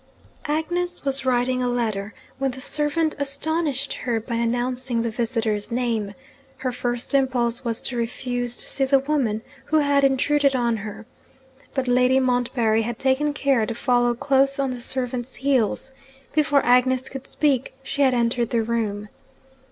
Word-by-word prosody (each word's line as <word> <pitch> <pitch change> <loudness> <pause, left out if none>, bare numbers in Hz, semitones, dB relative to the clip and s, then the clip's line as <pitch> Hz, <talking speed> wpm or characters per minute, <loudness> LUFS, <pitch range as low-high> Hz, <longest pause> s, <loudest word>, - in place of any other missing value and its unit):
Agnes 350 +3 -2
was 270 -1 0
writing 255 0 +1
a 250 - +1
letter, 220 -4 -1 0.3
when 270 0 +1
the 260 +1 -7
servant 300 +3 +1
astonished 285 0 -1
her 235 -3 -2
by 235 +2 -6
announcing 240 +1 -1
the 230 - -1
visitor's 225 -3 -1
name. 230 -4 -1 0.4
Her 255 -1 -2
first 245 +1 -3
impulse 255 -3 +1
was 230 -2 -2
to 250 - -2
refuse 245 +1 -2
to - - -4
see 275 - 0
the 275 +1 +4
woman 265 -6 0 0.2
who 315 - +2
had 285 -2 +3
intruded 275 +1 +3
on 235 -2 +1
her. 215 +1 -8 0.7
But 265 -2 -1
Lady 250 +1 +4
Montbarry 245 -3 +1
had 230 0 -3
taken 270 +3 +2
care 275 -6 +1
to 230 - -3
follow 245 0 +2
close 275 +2 +2
on 275 -2 0
the 245 -1 -5
servant's 250 0 -2
heels. 265 -1 0 0.4
Before 290 -2 +3
Agnes 250 +1 +3
could 270 0 -7
speak, 270 -4 0
she 280 +1 -3
had 260 -2 +4
entered 235 0 +1
the 230 -2 +1
room. 215 -2 -2
250 Hz, 160 wpm, -23 LUFS, 235-275 Hz, 0.7 s, the